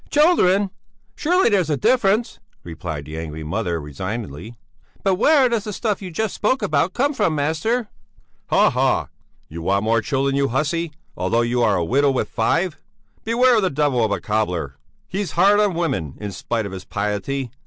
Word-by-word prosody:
"Children! 205 Hz, -, +3 dB, 0.4 s
Surely, 360 Hz, +4 st, +2 dB
there's 190 Hz, -7 st, +2 dB
a 150 Hz, -, +1 dB
difference," 220 Hz, -, +2 dB, 0.2 s
replied 80 Hz, -3 st, -6 dB
the 75 Hz, +2 st, -6 dB
angry 80 Hz, -1 st, -6 dB
mother, 85 Hz, +1 st, -2 dB
resignedly; 95 Hz, -, -6 dB, 0.5 s
"but 195 Hz, -, +3 dB
where 270 Hz, +7 st, +4 dB
does 230 Hz, -3 st, -1 dB
the 210 Hz, -, -4 dB
stuff 210 Hz, -1 st, -2 dB
you 190 Hz, -, -6 dB
just 210 Hz, +5 st, -2 dB
spoke 260 Hz, +6 st, 0 dB
about 155 Hz, +4 st, +1 dB
come 280 Hz, +4 st, +1 dB
from, 165 Hz, -, +1 dB
master?" 160 Hz, +11 st, 0 dB, 0.6 s
"Haha! -, -, +2 dB, 0.4 s
You 85 Hz, +2 st, -8 dB
want 100 Hz, +4 st, +1 dB
more 115 Hz, +1 st, +2 dB
children, 135 Hz, +2 st, 0 dB
you 140 Hz, 0 st, +2 dB
hussy, 155 Hz, +6 st, -1 dB, 0.2 s
although 115 Hz, -, +1 dB
you 120 Hz, +1 st, 0 dB
are -, -, +3 dB
a 85 Hz, -, 0 dB
widow 140 Hz, +8 st, +3 dB
with 130 Hz, -, -1 dB
five! 170 Hz, -1 st, 0 dB, 0.5 s
Beware 240 Hz, +2 st, +4 dB
of -, -, +3 dB
that 185 Hz, -8 st, -1 dB
devil 140 Hz, -5 st, +2 dB
of 110 Hz, -, +1 dB
a -, -, 0 dB
cobbler! 90 Hz, -10 st, -2 dB, 0.3 s
He's 195 Hz, 0 st, -3 dB
hard 200 Hz, +4 st, +5 dB
on 205 Hz, -4 st, +2 dB
women, 120 Hz, -, -2 dB
in 105 Hz, -1 st, -5 dB
spite 110 Hz, +4 st, -3 dB
of 100 Hz, -, -6 dB
his 95 Hz, -1 st, -7 dB
piety. 105 Hz, +6 st, -3 dB
140 Hz, 175 wpm, -21 LUFS, -, 0.6 s, hard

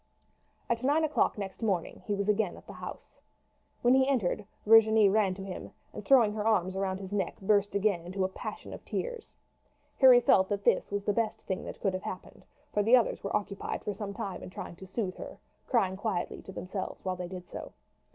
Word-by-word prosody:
At 235 Hz, +1 st, -1 dB
nine 295 Hz, +4 st, +3 dB
o'clock 305 Hz, -6 st, +1 dB
next 195 Hz, 0 st, -6 dB
morning 195 Hz, -7 st, -1 dB
he 205 Hz, -, 0 dB
was 200 Hz, 0 st, -2 dB
again 210 Hz, -3 st, +1 dB
at -, -, -15 dB
the -, -, -10 dB
house. -, -, -10 dB, 0.6 s
When 245 Hz, +1 st, +5 dB
he 265 Hz, 0 st, +4 dB
entered 210 Hz, -6 st, 0 dB, 0.2 s
Virginie 220 Hz, -1 st, +7 dB
ran 195 Hz, -2 st, +2 dB
to 195 Hz, -, -7 dB
him, 190 Hz, -2 st, -7 dB, 0.2 s
and -, -, -7 dB
throwing 240 Hz, -7 st, +5 dB
her 210 Hz, -1 st, -2 dB
arms 190 Hz, -4 st, +2 dB
round 190 Hz, -1 st, -1 dB
his 190 Hz, -1 st, -8 dB
neck 205 Hz, -1 st, -1 dB
again 190 Hz, -, -12 dB
burst 205 Hz, -1 st, +3 dB
into 190 Hz, -2 st, 0 dB
a -, -, +2 dB
passion 190 Hz, -, -7 dB
of -, -, -9 dB
tears. 485 Hz, -3 st, -4 dB, 0.7 s
Harry 255 Hz, -2 st, +9 dB
felt 190 Hz, -5 st, +4 dB
that 200 Hz, 0 st, -2 dB
this -, -, +2 dB
was 200 Hz, 0 st, -2 dB
the 205 Hz, -, +1 dB
best 225 Hz, 0 st, -1 dB
thing 190 Hz, -2 st, -3 dB
that -, -, -8 dB
could 195 Hz, -3 st, +1 dB
have 185 Hz, -, -3 dB
happened, 185 Hz, -, -8 dB, 0.3 s
for 210 Hz, -, +2 dB
the 225 Hz, +5 st, +6 dB
others 245 Hz, -, +1 dB
were 200 Hz, -, +1 dB
occupied 200 Hz, -1 st, -5 dB
for 210 Hz, -, -2 dB
some 200 Hz, 0 st, -5 dB
time 195 Hz, -2 st, -5 dB
in -, -, -8 dB
trying 180 Hz, -, -8 dB
to 190 Hz, -, -11 dB
soothe 190 Hz, -1 st, -3 dB
her, -, -, -8 dB, 0.3 s
crying 195 Hz, -7 st, +2 dB
quietly 195 Hz, -3 st, -3 dB
to -, -, -10 dB
themselves 190 Hz, +1 st, -6 dB
while 185 Hz, -1 st, -1 dB
they 180 Hz, -1 st, -5 dB
did 180 Hz, -1 st, -8 dB
so. -, -, -8 dB
200 Hz, 215 wpm, -30 LUFS, 190-220 Hz, 0.7 s, Harry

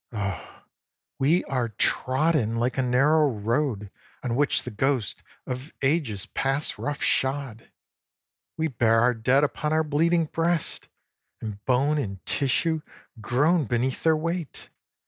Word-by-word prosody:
Oh 100 Hz, -4 st, -5 dB, 0.6 s
we 155 Hz, +7 st, +3 dB
are 125 Hz, -3 st, -1 dB
trodden 130 Hz, -, +1 dB
like 120 Hz, +2 st, 0 dB
a -, -, +4 dB
narrow 140 Hz, +5 st, +3 dB
road 115 Hz, -2 st, -1 dB, 0.3 s
On 120 Hz, -3 st, -1 dB
which 145 Hz, +2 st, +2 dB
the 125 Hz, -, -6 dB
ghosts 120 Hz, -2 st, -1 dB, 0.2 s
of 130 Hz, +4 st, -6 dB
ages 135 Hz, -, 0 dB
pass 135 Hz, +2 st, -2 dB
rough 145 Hz, 0 st, -3 dB
shod; 130 Hz, -4 st, -1 dB, 0.9 s
We 160 Hz, 0 st, +1 dB
bear 115 Hz, -4 st, +2 dB
our 125 Hz, +1 st, +4 dB
dead 125 Hz, +5 st, +2 dB
upon 150 Hz, +1 st, -1 dB
our 160 Hz, 0 st, +3 dB
bleeding 165 Hz, +3 st, +2 dB
breasts, 165 Hz, +1 st, -1 dB, 0.5 s
And 105 Hz, -2 st, -7 dB
bone 140 Hz, +4 st, +2 dB
and 100 Hz, -8 st, -5 dB
tissue 155 Hz, +4 st, +1 dB, 0.4 s
groan 145 Hz, -, +2 dB
beneath 125 Hz, +2 st, -1 dB
their 160 Hz, -1 st, +3 dB
weight. 165 Hz, 0 st, -4 dB
135 Hz, 130 wpm, -25 LUFS, 115-155 Hz, 0.9 s, a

